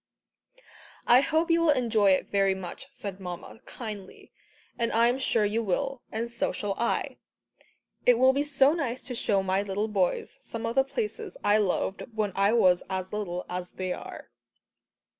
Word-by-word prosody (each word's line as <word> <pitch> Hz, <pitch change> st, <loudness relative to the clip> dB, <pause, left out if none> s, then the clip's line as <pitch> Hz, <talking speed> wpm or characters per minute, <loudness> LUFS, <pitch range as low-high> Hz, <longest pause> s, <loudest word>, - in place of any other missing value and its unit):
"I 245 Hz, +2 st, +7 dB
hope 320 Hz, +4 st, +1 dB
you 335 Hz, 0 st, +4 dB
will 335 Hz, -, +3 dB
enjoy 230 Hz, -7 st, +3 dB
it 185 Hz, -, -1 dB
very 195 Hz, -1 st, +3 dB
much," 190 Hz, +8 st, -8 dB
said 200 Hz, -8 st, -7 dB
Mamma 180 Hz, +3 st, -8 dB
kindly, 210 Hz, -5 st, -8 dB, 0.4 s
"and 230 Hz, -1 st, -1 dB
I 230 Hz, +1 st, +4 dB
am 250 Hz, +2 st, 0 dB
sure 230 Hz, -5 st, +2 dB
you 215 Hz, +3 st, 0 dB
will, 270 Hz, +6 st, -2 dB
and 225 Hz, +2 st, -2 dB
so 235 Hz, -, -1 dB
shall 205 Hz, -1 st, -3 dB
I. 235 Hz, -, -1 dB, 0.9 s
It 245 Hz, -1 st, +7 dB
will 260 Hz, +2 st, +5 dB
be 280 Hz, -, +1 dB
so 285 Hz, 0 st, +4 dB
nice 260 Hz, -7 st, -3 dB
to 250 Hz, -, -6 dB
show 200 Hz, -4 st, +1 dB
my 190 Hz, +1 st, +1 dB
little 205 Hz, +1 st, -2 dB
boys 195 Hz, -4 st, -1 dB
some 230 Hz, 0 st, -6 dB
of 230 Hz, -, -1 dB
the 270 Hz, -, +4 dB
places 425 Hz, -, -4 dB
I 205 Hz, +1 st, +4 dB
loved 195 Hz, -1 st, 0 dB
when 210 Hz, -2 st, 0 dB
I 200 Hz, +1 st, +3 dB
was 185 Hz, -6 st, +4 dB
as 190 Hz, 0 st, -4 dB
little 180 Hz, -4 st, -3 dB
as 180 Hz, 0 st, -5 dB
they 185 Hz, -1 st, -3 dB
are." -, -, -9 dB
220 Hz, 180 wpm, -28 LUFS, 195-260 Hz, 0.9 s, I